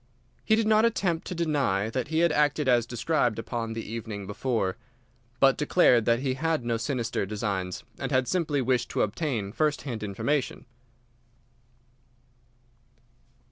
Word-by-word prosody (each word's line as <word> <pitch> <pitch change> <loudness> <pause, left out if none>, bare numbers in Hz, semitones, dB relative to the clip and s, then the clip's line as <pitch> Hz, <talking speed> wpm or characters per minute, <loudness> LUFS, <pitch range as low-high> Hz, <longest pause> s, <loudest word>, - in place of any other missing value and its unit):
He 220 - +3
did 225 0 +1
not 215 0 +4
attempt 190 -7 0
to 180 - -4
deny 140 - 0
that 130 0 -2
he 160 +2 +1
had 170 -1 +4
acted 150 -1 +1
as 120 -2 +3
described 120 -1 0
upon 115 -1 -4
the 115 0 -6
evening 110 -3 -5
before, 105 -2 -1 0.6
but 135 0 +5
declared 135 -7 +4
that 120 +1 +2
he 135 -2 0
had 155 -1 -1
no 115 -1 0
sinister 115 -1 -2
designs, 100 -3 -3 0.2
and - - -3
had 130 -1 +2
simply 155 -7 0
wished 125 -1 +1
to - - +1
obtain 110 -3 -2
first 150 +4 0
hand 120 -6 -5
information. 125 +8 -2
125 Hz, 145 wpm, -27 LUFS, 110-150 Hz, 0.6 s, but